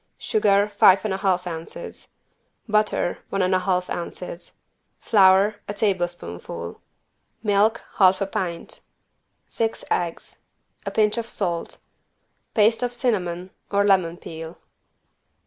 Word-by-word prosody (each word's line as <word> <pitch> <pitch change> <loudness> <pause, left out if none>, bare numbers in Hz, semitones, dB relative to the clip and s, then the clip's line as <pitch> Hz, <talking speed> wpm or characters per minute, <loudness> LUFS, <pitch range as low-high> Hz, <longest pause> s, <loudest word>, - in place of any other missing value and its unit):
Sugar, 205 -2 +2
five 200 -1 +5
and 210 - 0
a - - -1
half 185 -2 0
ounces. 175 - -7 0.6
Butter, 210 -4 +1
one 195 -1 0
and 185 +1 +1
a 185 - +3
half 180 -1 0
ounces. 175 0 -6 0.4
Flour, 200 0 +4
a 205 - -4
tablespoonful. 175 - -3 0.6
Milk, 215 +2 +2 0.2
half 190 -1 +5
a 195 - 0
pint. 185 -4 -4 0.7
Six 225 -1 -3
eggs. 170 -2 -2 0.5
A - - +2
pinch 215 +1 +2
of 230 0 -5
salt. 175 -4 -3 0.8
Paste 220 +2 +4
of 245 -1 -1
cinnamon 185 -7 -1 0.2
or 200 0 +2
lemon 185 -4 +3
peel. 165 -1 -9
195 Hz, 120 wpm, -23 LUFS, 175-210 Hz, 0.8 s, five